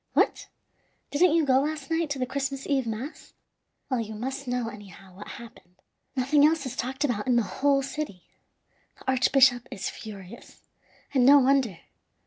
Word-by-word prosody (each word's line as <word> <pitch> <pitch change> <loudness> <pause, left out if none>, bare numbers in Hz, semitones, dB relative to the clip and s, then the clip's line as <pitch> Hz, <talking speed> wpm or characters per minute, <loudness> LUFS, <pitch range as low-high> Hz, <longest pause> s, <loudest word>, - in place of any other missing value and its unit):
What! - - +1 0.6
didn't 325 +2 +4
you 325 -2 +3
go 260 -1 +4
last 300 +1 -3
night 325 -1 0
to 285 - -2
the 255 - -1
Christmas 275 +1 -3
Eve 270 -4 0
mass? 225 +8 -6 0.5
Well, 255 -3 -1
you 220 -1 -5
must 265 +4 -5
know, 245 -1 -1
anyhow, 195 -3 -11
what 205 +2 -10
happened. 220 -6 -12 0.4
Nothing 275 +3 +3
else 310 -1 +3
is 255 -1 -5
talked 265 +3 -3
about 240 -6 -1
in 250 - +3
the 235 - +3
whole 275 +8 +1
city. 270 -9 -5 0.7
The - - -2
archbishop 260 -1 +4
is 195 - -4
furious, 205 0 -11 0.5
and 260 -3 +4
no 280 +3 +8
wonder. 265 - +2
260 Hz, 165 wpm, -27 LUFS, 230-280 Hz, 0.7 s, no